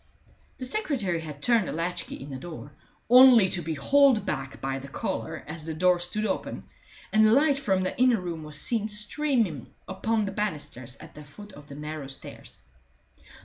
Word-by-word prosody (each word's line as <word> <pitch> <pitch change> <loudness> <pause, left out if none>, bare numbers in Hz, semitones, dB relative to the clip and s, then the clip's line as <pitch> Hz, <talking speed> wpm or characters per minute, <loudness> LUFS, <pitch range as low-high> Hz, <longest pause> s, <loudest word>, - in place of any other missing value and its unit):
The 255 - -6
secretary 250 - -1
had 150 -3 -9
turned 230 -5 +3
the - - -3
latch 170 +2 -3
key - - -8
in 140 +2 -9
the 130 - -5
door, 150 0 -9 0.4
only 245 -4 +8
to 175 - +3
be 160 0 -4
hauled 270 - +4
back 135 -2 -4
by 135 0 -3
the 135 - -10
collar 115 -4 -4
as 155 +1 -7
the 160 - -4
door 180 +2 +3
stood 195 +5 0
open, 195 - -3 0.5
and 215 0 +5
the - - +4
light 280 +3 +4
from 195 -9 0
the 185 - -2
inner 250 -3 +4
room 170 -3 -5
was 150 -1 -3
seen 220 +1 +2
streaming 210 - -1 0.2
upon 215 +3 -1
the 195 - -4
banisters 150 - -4
at 160 +1 -13
the 150 - -11
foot 205 +8 -13
of 145 -3 -14
the 140 - -10
narrow 150 -1 -6
stairs. 135 - -10
180 Hz, 190 wpm, -26 LUFS, 150-220 Hz, 0.5 s, only